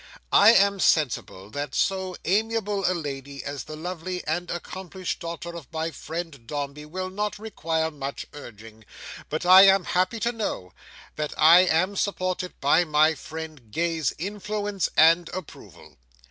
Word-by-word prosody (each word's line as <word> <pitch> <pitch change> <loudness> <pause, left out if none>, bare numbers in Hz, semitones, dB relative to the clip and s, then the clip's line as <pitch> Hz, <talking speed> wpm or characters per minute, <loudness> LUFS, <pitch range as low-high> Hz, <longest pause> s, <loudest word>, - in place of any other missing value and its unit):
I 210 +3 +8
am 200 -1 +4
sensible 115 - 0
that 145 +3 -4
so 190 -1 0
amiable 210 0 0
a - - -1
lady 140 -3 -6
as 145 -1 -5
the 155 - -8
lovely 180 +2 -5
and 175 +3 -2
accomplished 185 +1 -5
daughter 170 0 -6
of 165 -5 -10
my 160 +1 -2
friend 160 -5 -7
Dombey 145 0 -5
will 185 +3 -5
not 210 +1 -3
require 165 -7 -2
much 140 -2 -6
urging; 110 -5 -12 0.5
but 155 +3 -3
I 190 +2 +9
am 195 -1 +5
happy 185 +7 0
to 235 - +1
know, 205 - -4 0.4
that 150 -1 -3
I 165 +3 +8
am 185 +4 +1
supported 185 -2 -2
by 145 +5 +4
my 155 0 +3
friend 155 -7 -9
Gay's 165 +1 0
influence 205 +1 -3
and 165 +2 +5
approval. 185 -4 -11
170 Hz, 145 wpm, -25 LUFS, 150-190 Hz, 0.5 s, I